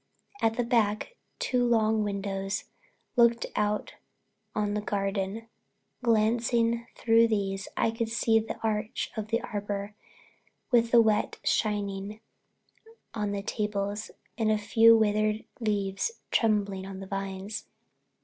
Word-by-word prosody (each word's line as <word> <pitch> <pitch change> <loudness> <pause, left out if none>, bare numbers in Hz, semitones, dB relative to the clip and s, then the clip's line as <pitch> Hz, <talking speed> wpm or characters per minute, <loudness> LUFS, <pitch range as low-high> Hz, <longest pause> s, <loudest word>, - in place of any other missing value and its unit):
At 225 0 +2
the 245 - +2
back 230 - +1 0.2
two 250 -1 +1
long 220 -2 +3
windows 195 0 -2 0.5
looked 235 -1 +4
out 210 0 0 0.6
on 210 -1 0
the 210 - -1
garden. 200 +2 -2 0.5
Glancing 235 0 +2
through 230 0 +4
these 195 -3 -1
I 225 - +2
could 225 0 -2
see 225 -1 +3
the 220 - -5
arch 215 -1 -1
of 220 -2 -3
the 230 +2 0
arbor, 205 -1 -4 0.8
with 235 -2 +4
the 235 -1 +6
wet 215 -1 +1
shining 205 -1 -1 0.9
on 210 -2 -2
the 200 -1 -3
tables 210 0 -2 0.3
and 220 -1 +2
a 215 - +3
few 225 +2 +6
withered 215 0 +1
leaves 205 - -1 0.2
trembling 200 -4 +1
on 195 -1 -7
the 195 - -7
vines. 195 +1 -5
215 Hz, 125 wpm, -28 LUFS, 200-225 Hz, 0.9 s, the